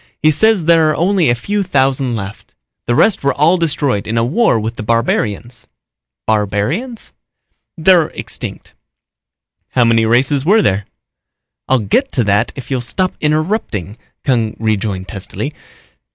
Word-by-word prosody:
He 155 - +3
says 205 +2 +2
there 165 -2 +4
are 155 - 0
only 180 -1 +2
a 120 - +3
few 205 - -2
thousand 135 -7 +1
left. 100 -1 -8 0.3
The 120 - +1
rest 210 - +3
were 140 - +1
all 165 +5 +3
destroyed 145 - -1
in 115 +2 -2
a 115 - +2
war 150 - +2
with 110 +2 -4
the - - -6
barbarians." 115 +1 -1 0.6
"Barbarians?" 110 - -2 0.6
"They're 170 -1 +4
extinct." - - -7 1.0
"How 125 -2 +4
many 115 -1 +3
races 130 +4 +2
were 210 +6 +4
there?" 100 +1 +1 0.8
"I'll 130 - +3
get 125 - 0
to 125 - +2
that 100 -1 +1
if 135 0 -9
you'll 130 -2 0
stop 185 +9 -1
interrupting," 150 - -1 0.3
Kung 115 -5 0
rejoined 105 -3 -2
testily. 100 -4 -5
130 Hz, 145 wpm, -16 LUFS, 110-165 Hz, 1.0 s, there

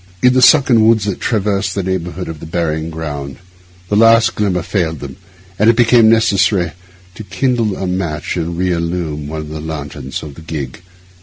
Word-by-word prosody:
In 125 0 +5
the 130 - +3
sunken 125 -5 +5
woods 110 -3 +3
that 100 -3 -3
traverse 100 -3 0
the 100 +1 -3
neighbourhood 90 -1 -3
of 80 -2 -7
the - - -9
burying 80 -1 -2
ground 75 -4 -6 0.5
the 105 - -1
last 115 +1 +5
glimmer 95 -5 -1
failed 80 -5 -2
them, 70 -2 -8 0.4
and 105 +2 +5
it 115 - +4
became 115 -1 +5
necessary 100 -5 +2 0.4
to 100 - -9
kindle 115 -2 -1
a 95 - -3
match 85 -5 -3
and 85 -1 -3
re 90 0 0
illumine 85 -3 -3
one 80 +1 -5
of 75 - -8
the 80 0 -6
lanterns 75 -4 -6
of 75 -2 -8
the 80 - -13
gig. 75 -3 -6
90 Hz, 185 wpm, -16 LUFS, 80-110 Hz, 0.5 s, In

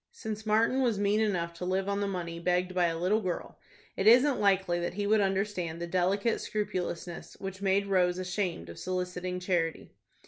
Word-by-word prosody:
Since 220 - -6
Martin 230 +5 +3
was 235 -5 +2
mean 205 +1 +2
enough 180 -6 0
to 170 - -8
live 190 +1 0
on 200 0 0
the 200 - 0
money 170 -3 -4
begged 180 +1 0
by 180 -1 +3
a 165 -1 -2
little 190 +6 +1
girl, 185 -3 -4 0.4
it 195 - 0
isn't 250 +5 +6
likely 190 -3 +2
that 175 +1 -3
he 205 0 -1
would 215 +1 +4
understand 190 -4 -1
the 170 - -3
delicate 190 +5 +1
scrupulousness 180 -4 -4
which 195 0 -6
made 200 0 +2
Rose 180 -2 +2
ashamed 180 - -2
of 85 - -9
soliciting 180 0 -3
charity. 175 -4 -1
185 Hz, 185 wpm, -30 LUFS, 180-205 Hz, 0.4 s, isn't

